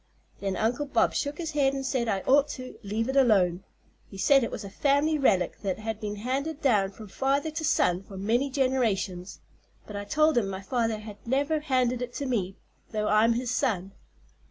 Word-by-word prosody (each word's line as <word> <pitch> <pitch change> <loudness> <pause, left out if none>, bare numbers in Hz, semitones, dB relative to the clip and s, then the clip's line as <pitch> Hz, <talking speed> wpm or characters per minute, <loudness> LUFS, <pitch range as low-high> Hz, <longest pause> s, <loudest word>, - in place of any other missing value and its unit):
Then 195 -1 -2
Uncle 240 +7 0
Bob 240 -4 +2
shook 290 0 -2
his 330 -3 -4
head 275 -2 +2
an' 270 - -3
said 255 -3 -1
I 195 -3 0
ought 280 +5 +4
to 255 0 -9
leave 220 +2 -2
it 265 - -2
alone. 195 -9 +3 0.5
He 195 - -10
said 275 +7 +4
it - - -1
was - - -6
a - - -6
fam'ly 290 +4 +2
relic 190 -10 +2
that 195 -3 -2
had 220 0 -4
been 210 -1 -4
handed 270 +8 -3
down 215 -10 +2
from 210 +2 -11
father 275 +8 0
to 315 +1 -4
son 180 - +2
for 195 0 -11
many 235 +8 +1
generations. 220 -9 -1 0.4
But 210 - -9
I 205 0 -4
told 305 +4 +3
him 200 -4 -2
my 190 0 -6
father 225 0 0
had 210 -1 -9
never 285 +5 +1
handed 255 -4 0
it 245 0 -5
to 285 - -3
me, 200 -7 -1 0.4
though 210 -1 -1
I'm 220 +2 +4
his 245 +1 -2
son. 200 -9 0
235 Hz, 205 wpm, -27 LUFS, 205-275 Hz, 0.5 s, ought